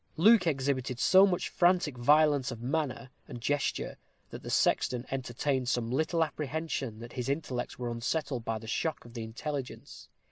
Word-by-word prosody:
Luke 200 +1 +6
exhibited 135 -4 -1
so 190 +7 +6
much 180 -2 -1
frantic 175 -5 +2
violence 145 +1 +4
of 120 -3 -6
manner 130 -1 -2 0.2
and 125 -4 -7
gesture, 140 +3 -1 0.3
that - - -8
the - - -8
sexton 125 0 +1
entertained 130 0 -1
some 120 -2 -1
little 160 +5 +1
apprehension 150 -5 -3
that 120 +1 -9
his 125 +1 -3
intellects 140 -4 -3
were 120 -1 -3
unsettled 125 +2 -2
by 115 0 -2
the 110 - -10
shock 155 +7 -2
of 120 - -13
the 120 - -5
intelligence. 125 +5 -6
135 Hz, 165 wpm, -30 LUFS, 120-155 Hz, 0.3 s, Luke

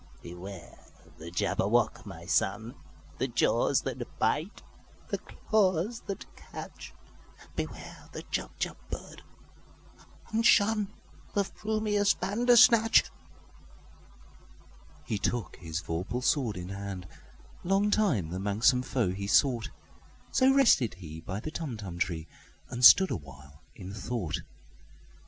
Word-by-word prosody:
"Beware 90 0 -10 0.4
the 80 +2 -8
Jabberwock, 85 - 0
my - - -9
son! 115 +3 0 0.5
The - - +1
jaws - - +2
that - - -6
bite, - - -1 0.5
the - - -2
claws 210 +1 0
that 195 - -5
catch! - - -10 0.6
Beware - - -6
the - - -7
Jubjub - - -4
bird, - - -8 1.1
and 225 0 0
shunThe 215 -2 +4 0.5
frumious 210 0 0
Bandersnatch!"He 225 - 0
took 120 +2 -2
his 80 -1 -4
vorpal 90 +10 -3
sword 125 - +1
in 90 0 -6
hand:Long 100 - -4
time 140 - +1
the 90 - -3
manxome 110 +6 +3
foe 120 -8 0
he 100 +2 -4
sought—So 135 - 0
rested 230 - +4
he 80 -4 -9
by 95 +5 -5
the 155 - -6
Tumtum 110 - -6
tree, 85 -3 -2 0.4
And 125 0 -5
stood 190 +9 +9
awhile 70 - -8
in 95 +1 -8
thought. 100 -7 -3
115 Hz, 105 wpm, -29 LUFS, -, 1.1 s, stood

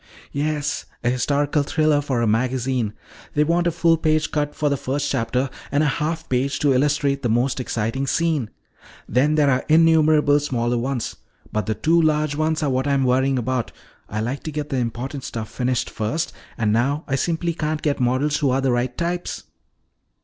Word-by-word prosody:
"Yes. 145 0 -2 0.2
A 120 - +2
historical 145 +4 +1
thriller 155 0 +2
for 130 -5 -1
a - - +2
magazine. 125 0 0 0.4
They 150 - +4
want 170 +3 +1
a - - +2
full 165 0 +3
page 155 0 +1
cut 145 -1 -1
for 150 - 0
the 140 - +2
first 140 +2 -2
chapter 125 +1 0 0.2
and 145 +2 +2
a 145 -1 0
half 160 +1 -2
page 130 +2 0
to 145 -2 +4
illustrate 140 +1 +1
the 120 - 0
most 120 +4 +1
exciting 120 +2 -2
scene. 155 -7 0 0.6
Then 145 +5 +2
there're 140 -4 +3
innumerable 155 -2 +5
smaller 120 -4 -1
ones. 125 -1 -3 0.3
But 105 -3 -2
the 110 - 0
two 165 +6 +3
large 155 -2 +2
ones 155 +1 0
are 145 - +1
what 130 +2 0
I'm 140 -1 +2
worrying 130 +1 +2
about. 125 0 -2 0.4
I 110 +1 -2
like 125 +5 -3
to 155 - -3
get 150 0 -4
the 135 - -1
important 125 +3 -3
stuff 110 -4 -5
finished 125 -1 -1
first, 130 +10 -2 0.2
and 105 -2 +1
now 140 +7 +1
I 135 - -3
simply 170 +4 0
can't 155 -1 -2
get 145 -2 0
models 130 +4 +1
who 145 - +1
are 130 +1 +1
the 135 -1 +1
right 120 +1 -1
types." 175 +1 -3
140 Hz, 185 wpm, -22 LUFS, 125-155 Hz, 0.6 s, innumerable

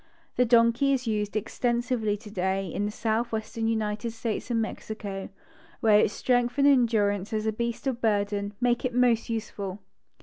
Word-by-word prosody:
The 250 - +3
donkey 235 +4 +4
is 255 -1 -1
used 210 -2 -1
extensively 235 0 0
today 195 -2 -2
in 195 +3 -2
the 210 - -2
southwestern 225 0 -2
United 215 0 -1
States 225 +1 -4
and 235 -2 +1
Mexico, 210 -3 -5 0.5
where 215 -2 +5
its 210 - +3
strength 245 0 +1
and 280 - +4
endurance 220 -7 +2
as 215 0 -1
a 220 - +2
beast 235 +3 -3
cf 265 -3 0
bürden 205 -2 0
make 245 -1 +1
it 250 -2 -2
most 240 -3 +3
useful. 205 -4 -4
225 Hz, 160 wpm, -27 LUFS, 210-240 Hz, 0.5 s, where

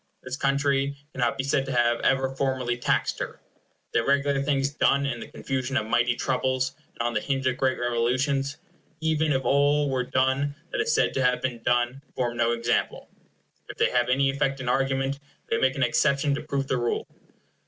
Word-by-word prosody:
This 130 0 -4
country 140 0 +1 0.2
cannot 125 +2 0
be 135 - -1
said 135 0 +1
to - - -3
have 120 -1 +2
ever 135 0 +1
formally 130 -3 0
taxed 120 - 0
her. - - -5 0.5
The - - +4
irregular 140 +3 +1
things 140 -1 0
done 140 -1 +2
in 125 -4 -2
the - - -7
confusion 135 0 -3
of 110 - 0
mighty 120 +1 +2
troubles 130 0 0 0.2
and - - -6
on 120 - -2
the - - 0
hinge 135 -2 -2
of 130 -1 +1
great 130 -1 +1
revolutions, 130 +4 0 0.4
even 160 -1 +1
if 135 -1 0
all 145 0 +3
were 130 -1 0
done 130 +3 0 0.2
that - - 0
is 460 +2 0
said - - +2
to 135 - 0
have 125 0 +3
been 125 -2 -3
done, 120 +3 +1
form 120 -2 -1
no 115 0 +2
example. 120 0 -1 0.6
If - - -8
they - - +2
have 120 0 +2
any 135 +2 +3
effect 135 -1 -1
in 130 - -5
argument, 135 +1 0 0.3
they 115 - +2
make 130 0 +2
an 135 - 0
exception 140 +3 +2
to 140 - -2
prove 140 -2 -2
the 130 - 0
rule. 120 -1 -1
135 Hz, 195 wpm, -26 LUFS, 125-140 Hz, 0.6 s, The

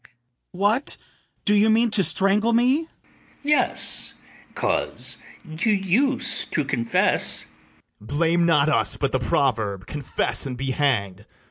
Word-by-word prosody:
What, 205 +8 -1 0.5
do 205 - +3
you 210 +1 +4
mean 230 +1 +3
to 200 -2 +1
strangle 205 +5 +1
me? 245 +3 +3
ITHAMORE. 320 +1 -4 0.5
Yes, 295 +1 0 0.4
'cause - - -2 0.3
you 160 +7 0
use 230 +7 +1
to 150 - -2
confess. 115 -4 +1 0.6
BARABAS. 125 +7 -6
Blame 170 +2 +2
not 150 -3 +3
us, 155 - +3
but 140 -2 -1
the 130 - 0
proverb, 110 -6 -1
Confess 145 -1 -1
and 125 -2 -6
be 135 +1 -3
hanged. 105 -9 -1
170 Hz, 130 wpm, -23 LUFS, 135-220 Hz, 0.6 s, you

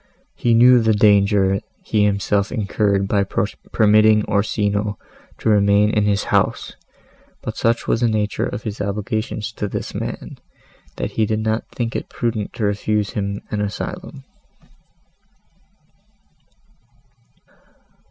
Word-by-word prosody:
He 120 -1 +1
knew 125 +2 +7
the 110 -1 +2
danger 100 -2 +3 0.2
he 105 -2 +1
himself 100 0 0
incurred 100 -3 0
by 100 0 +2 0.5
permitting 110 0 +4
Orsino 105 0 0 0.4
to - - -5
remain 105 0 +4
in 105 -2 +1
his 100 -1 +1
house, - - +1 0.7
but - - -5
such 115 0 0
was 115 - +1
the 120 - +3
nature 105 -1 -1
of - - -6
his 105 -2 -5
obligations 105 +3 -3
to 105 -2 -4
this - - -5
man, - - -6 0.6
that - - -4
he 110 -1 0
did 110 0 -1
not 110 +1 -2
think 115 -2 -4
it - - -4
prudent 115 -4 -3
to 110 - -5
refuse 105 0 0
him 100 -1 -3
an 105 - -1
asylum. 155 - -5
105 Hz, 125 wpm, -20 LUFS, 100-110 Hz, 0.7 s, knew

